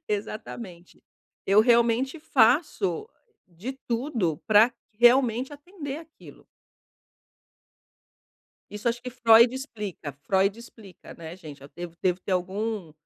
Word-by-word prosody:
exatamente, 200 -3 -6 0.4
eu 200 +2 +5
realmente 235 +5 +2
faço 245 - +2 0.4
de 185 +9 -7 0.2
tudo 230 - -1
pra 220 +2 +5 0.2
realmente 245 +3 +3
atender 290 -1 -8
aquilo. 320 -1 -16 2.2
Isso 210 +3 -3
acho 235 0 -3
que 250 - -6
Freud 235 0 +5
explica. 210 - -6
Freud 190 - 0
explica, 220 -5 -14
né, 165 0 -9
gente, 150 -6 -12
eu 140 - -12
devo 175 -1 -8
devo 180 0 +1
ter 190 - -4
algum 190 0 -3
220 Hz, 110 wpm, -26 LUFS, 185-250 Hz, 2.2 s, eu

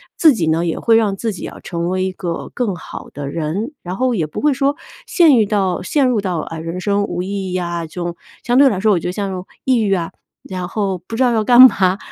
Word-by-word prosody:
自 315 -3 +6
己 170 -9 -1
呢， 165 +2 +1
也 165 - -2
会 230 - +3
让 215 -3 +2
自 225 +1 -2
己 185 - -7
啊 - - -10
成 170 0 -3
为 185 0 0
一 190 - -2
个 175 -2 -5
更 230 -6 -1
好 - - -9
的 145 -1 -6
人。 170 - -3
然 180 +2 -5
后 255 -2 +1
也 165 -6 0
不 150 - -6
会 295 -1 +3
说 275 +1 0 0.3
陷 325 -7 +5
遇 220 - +4
到 195 -3 0
陷 275 +8 +1
入 240 -4 +1
到， 185 -4 -2
啊， 165 +1 -6
人 165 +3 -5
生 200 +2 0
无 175 -3 -3
意 190 0 -4
义 - - 0
啊， 170 -1 -3
这 155 - -15
种 175 0 -3 0.3
相 245 +1 +1
对 275 0 +7
来 200 -6 -2
说 210 +1 +3
我 175 - +1
觉 - - -5
得 - - -2
像 190 -2 -4 0.2
抑 260 -2 +3
郁 200 -2 +1
啊， 170 -3 -2 0.3
然 185 -2 -5
后 195 -3 -1
不 185 +6 -8
知 260 - +3
道 245 - +3
要 220 -1 +1
干 245 +3 +7
嘛， 195 -7 +6
195 Hz, 280 characters per minute, -18 LUFS, 175-230 Hz, 0.3 s, 对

